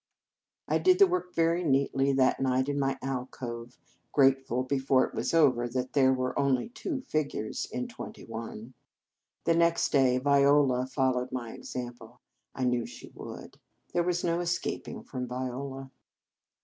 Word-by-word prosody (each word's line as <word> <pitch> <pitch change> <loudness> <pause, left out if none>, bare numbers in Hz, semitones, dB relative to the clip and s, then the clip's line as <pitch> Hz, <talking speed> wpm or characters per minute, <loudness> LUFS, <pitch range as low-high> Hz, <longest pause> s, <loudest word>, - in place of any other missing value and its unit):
I - - +2
did 370 -1 +5
the 400 - +8
work 180 - -2
very 165 +2 +2
neatly 135 -2 +2
that 130 -1 +3
night 130 0 +1
in 145 0 -1
my 135 -1 0
alcove, 125 -2 -5 0.3
grateful, 135 -2 +3
before 130 0 +2
it - - -10
was - - -1
over, 135 -7 +4
that 125 +1 -3
there 130 -2 +5
were 130 -1 -1
only 135 - +1
two 270 +3 -4
figures 150 - -2
in 245 +2 -3
twenty 230 -2 -9
one. 115 +1 -7 0.7
The 165 - +3
next 170 0 +2
day 130 -3 +4
Viola 140 -1 +4
followed 130 -1 0
my 120 -3 -4
example. 120 -1 -8 0.4
I 130 - -2
knew 125 -2 +1
she - - -11
would. - - -10 0.3
There 175 - +2
was 175 0 0
no 170 0 +1
escaping 175 0 -3
from 125 -1 -5
Viola. 130 +2 -5
135 Hz, 150 wpm, -29 LUFS, 125-150 Hz, 0.7 s, the